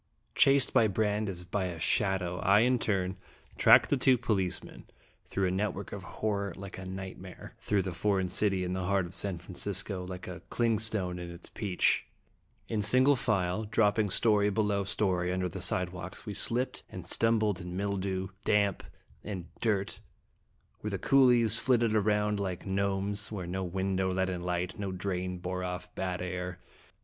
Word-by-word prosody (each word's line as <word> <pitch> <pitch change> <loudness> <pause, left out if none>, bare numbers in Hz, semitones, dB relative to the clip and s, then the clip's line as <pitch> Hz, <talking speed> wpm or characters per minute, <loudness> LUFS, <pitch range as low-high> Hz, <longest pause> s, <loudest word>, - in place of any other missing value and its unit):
ACT - - -44
II. - - -43 0.2
Chased 140 -2 +3
by 110 - +5
Brande 105 0 0
as 90 -2 -6
by 95 +2 -1
a 85 -2 -5
shadow, 90 +1 +1
I 100 +3 +5
in 125 +1 +3
turn 95 -3 -1 0.4
tracked 140 - +6
two 130 -2 +5
policemen, 95 -6 -2 0.4
through 95 - -1
a - - 0
net 100 +3 -1
work 100 - -7
of 100 - -6
horror 100 0 -2
like 95 -1 -8
a 95 - -7
nightmare 95 -1 -8
through 100 -2 0
the 90 -1 -4
foreign 95 +2 +1
city 95 0 +1
in 90 0 -2
the 95 -1 -2
heart 95 -1 +1
of 85 - -10
San 95 -1 -3
Francisco, 95 +1 -3
like 90 0 -7
a 90 -1 -7
clingstone 110 -6 0
in 90 0 -6
its 85 0 -10
peach. 100 -5 +1 0.6
In 110 -2 -1
single 130 +7 +5
file, 105 -5 0
drop 105 0 +2
ping 105 -2 +2
story 105 0 +3
below 105 -1 +1
story 90 -3 0
under 95 0 0
the 90 +1 -6
sidewalks, 90 0 -2
we 105 - -4
slipped 125 +5 0
and 90 -2 -8
stumbled 110 -2 +2
in 90 +1 -6
mildew, 95 -1 -2
damp, 100 -2 +2 0.4
and 95 -5 -6
dirt, 100 -4 0 0.8
where - - -4
the - - -2
coolies 120 -5 +5
flitted 120 -2 +2
round 105 -1 +1
like 95 -3 -3
gnomes, 100 +1 0
where 95 -4 -4
no 95 +2 -3
window 95 +1 -1
let 95 0 0
in 90 -1 -4
light, 90 +1 -2
no 100 -2 -3
drain 90 -1 -3
bore 90 +1 -4
off 90 0 -5
bad 90 -1 -3
air. 90 0 -4
95 Hz, 175 wpm, -30 LUFS, 90-105 Hz, 0.8 s, tracked